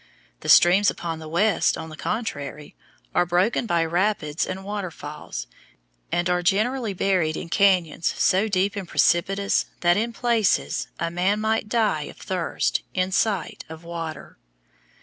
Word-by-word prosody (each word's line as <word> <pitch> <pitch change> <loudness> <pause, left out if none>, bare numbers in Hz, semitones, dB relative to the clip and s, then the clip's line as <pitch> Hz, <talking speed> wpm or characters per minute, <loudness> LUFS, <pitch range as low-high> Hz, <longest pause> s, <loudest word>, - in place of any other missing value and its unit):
The - - -6
streams 190 +4 +6
upon 165 -2 -4
the 160 - -9
west, 195 +4 +2
on 160 - -7
the 155 - -9
contrary, 150 - -4 0.4
are - - +4
broken 180 +7 +1
by 170 -3 +2
rapids 170 -3 0
and 190 +1 -5
waterfalls, 180 -7 -6 0.7
and 175 +1 +1
are 180 0 +1
generally 215 +4 0
buried 180 -5 +1
in 165 - -7
cañons 180 -5 +2
so 195 +4 +2
deep 195 0 0
and 195 -3 -5
precipitous 195 +5 +2
that 175 +1 +4
in 230 +3 0
places 230 -3 +1
a 170 0 -1
man 185 +4 +1
might 220 0 0
die 210 -10 +1
of - - -13
thirst 185 -3 -1
in 185 0 0
sight 195 -3 0
of 160 +1 -10
water. 165 -2 -7
185 Hz, 150 wpm, -24 LUFS, 165-205 Hz, 0.7 s, streams